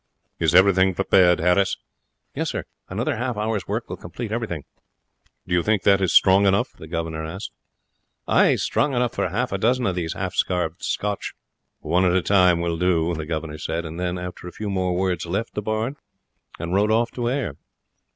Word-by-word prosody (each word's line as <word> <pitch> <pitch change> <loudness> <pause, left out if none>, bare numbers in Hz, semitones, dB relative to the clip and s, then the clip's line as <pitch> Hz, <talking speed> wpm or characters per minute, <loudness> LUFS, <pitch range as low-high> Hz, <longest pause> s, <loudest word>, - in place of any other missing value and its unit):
"Is - - +2
everything 95 -1 +5
prepared, 90 -2 +4
Harris?" 90 +3 +2 0.6
"Yes, - - -2
sir; - - -3 0.3
another 120 +8 -1
half 125 -1 -2
hour's 105 -2 -2
work - - -3
will - - -6
complete 105 +6 -7
everything." 110 -10 -3 0.8
"Do 90 - -4
you 90 - +4
think 105 +1 +1
that 100 -1 +4
is 95 - +1
strong 95 +1 +5
enough?" 100 +7 +1
the 80 - -12
governor 80 -1 -3
asked. 90 +6 -6 0.8
"Ay; - - +4
strong 145 -3 0
enough 120 -1 +1
for 95 - -1
half 125 +8 -1
a 95 - -2
dozen 125 +4 +2
of 95 - +1
these 85 -2 -3
half - - -4
starved 90 -1 -1
Scots." 105 -1 -2 0.5
"One 90 +2 +1
at 90 -1 +3
a 95 - +2
time 90 -4 +4
will 85 -1 -2
do," 85 -2 +2
the 80 -2 -5
governor 80 -1 -4
said; 85 +3 -3
and 80 +2 -7
then, 90 0 -2
after 90 0 -7
a - - -7
few 105 +1 -5
more 90 -2 0
words, 90 -2 -1
left 100 +7 -2
the 105 - -3
barn 110 +6 -2 0.6
and 85 +2 -4
rode 100 +2 +3
off 115 +2 +2
to 120 -1 -2
Ayr. 125 - -2
95 Hz, 195 wpm, -23 LUFS, 85-105 Hz, 0.8 s, everything